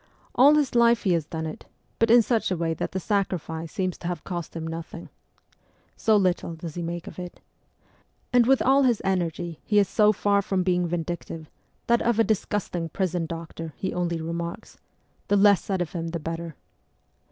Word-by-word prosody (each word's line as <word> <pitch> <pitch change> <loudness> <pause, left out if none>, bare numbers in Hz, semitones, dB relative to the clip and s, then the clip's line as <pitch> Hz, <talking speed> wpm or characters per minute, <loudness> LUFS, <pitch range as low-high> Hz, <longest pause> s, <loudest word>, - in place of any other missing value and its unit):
All 280 +4 +6
his 295 -4 +1
life 235 -1 +4
he 185 - +3
has 165 -3 0
done 160 0 -4
it, 155 - -7 0.3
but 230 - +3
in 235 0 +7
such 230 0 0
a 185 - -1
way 165 0 0
that - - -4
the 190 - -2
sacrifice 170 -5 -2
seems 185 -2 -2
to 170 - -5
have 175 -3 -4
cost 175 -3 -5
him 165 -1 -4
nothing. 165 +1 -7 0.9
So 220 -1 +3
little 180 -3 0
does 165 -1 -7
he 175 - -5
make 170 0 -4
of - - -9
it. 180 -1 -8 0.9
And 245 -1 +5
with 270 0 +4
all 270 +2 +5
his 245 -5 +2
energy 175 -3 -1
he 210 - +1
is 200 -2 +5
so 210 -1 +4
far 200 -1 +2
from 195 -2 -1
being 180 -1 +1
vindictive, 165 -2 -5 0.3
that 235 0 +3
of 235 -2 +1
a 225 - +5
disgusting 200 -5 -1
prison 175 -1 -1
doctor 165 -1 -7
he 190 - -3
only 170 -2 -1
remarks: 170 +5 -5 0.2
' - - -41
The 205 - +3
less 200 -1 +5
said 190 -3 -1
of 165 - -10
him 165 -2 -4
the 165 0 -3
better.' 165 0 -5
180 Hz, 195 wpm, -25 LUFS, 165-205 Hz, 0.9 s, in